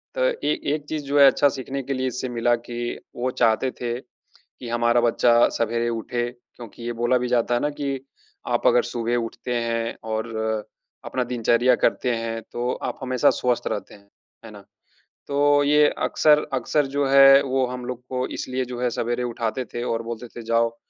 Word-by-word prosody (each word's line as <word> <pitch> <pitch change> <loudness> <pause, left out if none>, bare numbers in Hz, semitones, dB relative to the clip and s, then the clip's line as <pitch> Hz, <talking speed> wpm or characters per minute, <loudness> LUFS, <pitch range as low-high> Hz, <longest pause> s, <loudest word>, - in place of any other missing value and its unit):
तो - - -2
ए - - -1 0.2
एक 150 -1 -4
चीज़ 155 -2 -3
जो 145 +1 +1
है 140 - +9
अच्छा 145 +1 +4
सीखने 135 +1 -5
के 135 - -3
लिए 130 0 -1
इससे 130 +1 -3
मिला 120 0 +1
कि, 120 0 -5 0.2
वो 125 +1 -1
चाहते 125 0 +2
थे 120 0 -2 0.4
कि 120 - -12
हमारा 120 +1 +2
बच्चा 120 0 +4
सवेरे 115 +1 0
उठे 120 +1 -2
क्योंकि 120 -2 -14
ये 120 - -3
बोला 120 +2 +3
भी 125 0 -2
जाता 120 -1 +1
है 120 - +2
ना 150 - +1
कि 140 -2 -2 0.5
आप - - +1
अगर - - +4
सुबह 120 - -2
उठते 120 +2 -6
हैं 115 0 -2 0.2
और 110 +1 -2 0.8
अपना 130 - -1
दिनचर्या 120 +1 +2
करते 125 - +1
हैं, 115 0 -4
तो 120 +1 -2
आप - - -4
हमेशा 130 -1 +2
स्वस्थ 120 -1 0
रहते 100 - -4
हैं। 100 0 -21 0.4
है - - -10
ना? - - -12 0.6
तो 145 0 +3
ये 150 +1 +5 0.2
अक्सर, 150 -1 +3
अक्सर 135 +3 +1
जो 145 0 +2
है 135 0 +8
वो 130 -1 +1
हम 125 0 -6
लोग 125 -1 -5
को 130 0 -1
इसलिए 130 0 -3
जो 125 0 -6
है 125 - +2
सवेरे 120 +1 -1
उठाते 120 +1 -3
थे 120 - -3
और 115 -2 -1
बोलते 115 +1 -6
थे 120 - -6
जाओ 115 0 +1
125 Hz, 190 wpm, -23 LUFS, 120-135 Hz, 0.8 s, है